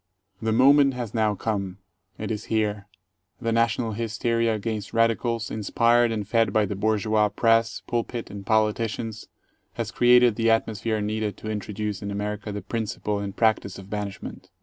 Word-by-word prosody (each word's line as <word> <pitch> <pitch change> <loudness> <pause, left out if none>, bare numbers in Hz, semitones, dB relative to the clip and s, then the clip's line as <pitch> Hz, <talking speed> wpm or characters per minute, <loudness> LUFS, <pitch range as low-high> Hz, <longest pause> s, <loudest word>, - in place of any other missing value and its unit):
The 110 0 0
moment 135 +3 +5
has 120 -4 -5
now 110 -2 +1
come. 100 -3 -3 0.4
It 110 +1 -4
is 105 0 -4
here. 105 -2 -1 0.5
The 115 -2 -1
national 115 0 +1
hysteria 115 +1 0
against 110 0 -4
radicals, 115 0 +1
inspired 115 +2 +2
and 105 -3 -3
fed 115 +1 +2
by 110 -1 +3
the 100 - -4
bourgeois 110 +1 +1
press, 115 +1 +2
pulpit, 120 0 -3
and 100 0 -7
politicians, 110 +1 -1 0.5
has - - -4
created 120 -2 +5
the 115 0 +2
atmosphere 110 -1 0
needed 105 0 -2
to 110 - -5
introduce 105 0 -4
in 100 - -4
America 105 +1 -4
the 105 -2 -5
principle 105 -1 -3
and 100 -1 -5
practice 110 -4 +1
of 95 +1 -12
banishment. 100 -2 -6
110 Hz, 155 wpm, -25 LUFS, 105-115 Hz, 0.5 s, moment